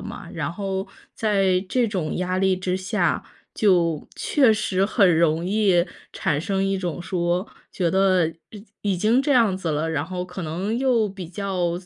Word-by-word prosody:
嘛， - - -8
然 - - -3
后 195 +1 -3 0.3
在 195 -4 +2
这 245 -3 +1
种 180 -7 -2
压 185 0 -1
力 190 0 +3
之 185 0 -2
下， 185 -2 0 0.3
就 175 -6 +2
确 265 -7 +3
实 195 -2 0
很 190 -7 +4
容 165 0 +2
易 190 -3 +3 0.3
产 145 -1 -1
生 195 +3 -1
一 195 0 0
种 175 -2 -4
说， 175 +1 -1 0.2
觉 175 -3 0
得 185 -2 +3 0.2
已 210 -1 -11 0.3
已 - - -1
经 220 +7 +3
这 280 +1 +1
样 225 -7 +4
子 170 -4 -2
了， 155 +2 -1
然 150 -2 -1
后 180 0 -4
可 180 0 -7
能 180 +8 -2
又 245 -5 +2
比 190 -4 -8
较 180 -2 -2
185 Hz, 185 characters per minute, -23 LUFS, 175-205 Hz, 0.3 s, 很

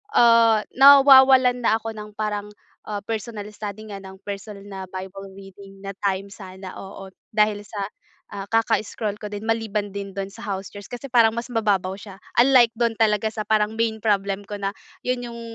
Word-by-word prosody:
ah, 230 -2 +5
nawawalan 265 -2 +7
na 220 - +4
ako 225 +1 -5
ng 210 -1 -9
parang, 210 -1 -3 0.4
ah, 205 -1 -4
personal 220 -1 -5
study 210 0 -7
nga 200 - -6
ng 190 0 -11
personal 200 0 -7
na 195 -2 -7
Bible 190 +1 -8
reading 195 0 -13
na 195 - -4
time 195 0 -1
sana, 190 -2 -10
oo, 195 0 -10 0.2
dahil 210 -1 +3
sa, 205 -2 -6 0.5
ah, 200 0 -6
kaka-scroll 215 -2 0
ko 210 - -6
din 205 +1 -6
maliban 215 -3 -1
din 200 -1 -6
dun 195 0 -4
sa - - -12
house 195 -1 -4
chores, 205 -1 -10
kasi 245 +3 -6
parang 230 -2 +4
mas 235 +1 -4
mababaw 200 -5 0
siya 200 -2 -11 0.2
unlike 245 -2 +6
dun 235 -1 +1
talaga 215 -1 +2
sa 215 -1 -3
parang 215 0 +1
main 220 -1 0
problem 200 -1 0
ko 205 - -5
na 195 0 -2 0.3
'yun 250 -1 -1
yung, 235 0 -9
210 Hz, 180 wpm, -23 LUFS, 195-225 Hz, 0.5 s, nawawalan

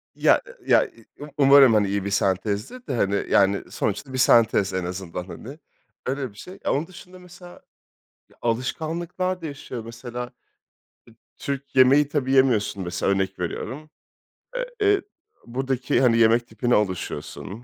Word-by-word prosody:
Ya - - +4 0.3
ya - - +5 0.3
Um 145 +1 -8
umarım, 140 -3 +7
hani, 105 -2 +3
iyi 100 0 -2
bir - - -1
sentezdir 100 - -1
de, 135 - -2
hani, 100 -3 0
yani 100 0 +2
sonuçta 120 +6 -3
bir - - -2
sentez 115 -6 +4
en 95 -1 -2
azından, 90 -1 -5
hani. 130 - -10 0.5
Öyle 135 0 -2
bir 100 - -21
şey. 185 +1 -11
Onun 150 +5 0
dışında 185 0 -13
mesela, 180 0 -13 0.8
ya, - - -25
alışkanlıklar 165 +9 -2
değişiyor, 140 -7 -7
mesela. 120 +1 -6
E, 125 - -19 1.1
Türk 140 -1 -5
yemeği 135 +3 +6
tabii 140 -3 -1
yemiyorsun 120 -7 +2
mesela, 90 +2 -1
örnek 95 -1 -1
veriyorum. 130 - -5 0.7
Eee, - - -1 0.2
eee, 405 -1 +4 0.4
buradaki, 130 0 -1
hani, 120 -3 +4
yemek 115 +1 +4
tipine 120 +2 0
alışıyorsun. 100 +2 -3
125 Hz, 145 wpm, -24 LUFS, 100-145 Hz, 1.1 s, umarım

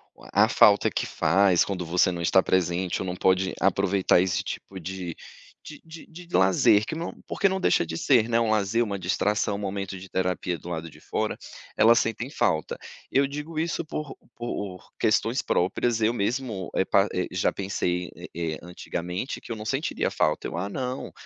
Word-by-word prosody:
o - - -17
a - - +5
falta - - +5
que - - -2
faz 95 +1 +3
quando 90 -3 -4
você 90 +2 +3
não 85 -1 -4
está 95 +3 +4
presente 90 0 0
ou 95 - -3
não 90 - -3
pode 95 +1 +2
aproveitar 95 -1 +3
esse 95 -2 0
tipo 95 - -7
de 90 -1 -5 0.5
de 150 - -11
de 160 0 -11
de 170 +1 -12
lazer, 105 +3 +4
que - - -3
não 165 +2 -4
porque 195 - +2
não 190 - -1
deixa 180 - +2
de 80 0 -5
ser, 120 +2 +3
né, 115 0 +3
um 115 -2 +1
lazer, 110 +2 +2
uma 100 -3 -3
distração, 100 +3 0
um - - -5
momento 100 -1 -4
de 95 - -10
terapia 90 -1 -1
do 85 +3 -10
lado 85 -1 -4
de - - -17
fora, - - -2 0.4
elas 115 +1 +6
sentem 115 +3 -2
falta. 80 - 0 0.3
Eu 135 +1 +3
digo 150 +3 -5
isso 170 +1 -1
por 150 -2 -5 0.2
por 105 -6 -5
questões 115 +4 +2
próprias, 115 +6 0
eu 110 +2 +3
mesmo, 110 -3 -2
eh, 95 - +1
pa 100 +1 +3
eh, 90 - -1
já 90 - +1
pensei, 90 -2 -2
eh - - -9 0.3
eh, - - -9
antigamente 90 +4 -5
que - - -10
eu 115 - -3
não 105 - -7
sentiria 135 +7 -1
falta, 75 - 0
eu: - - -5
"ah 95 +3 -2
não, 130 +2 -4
100 Hz, 195 wpm, -26 LUFS, 90-120 Hz, 0.5 s, elas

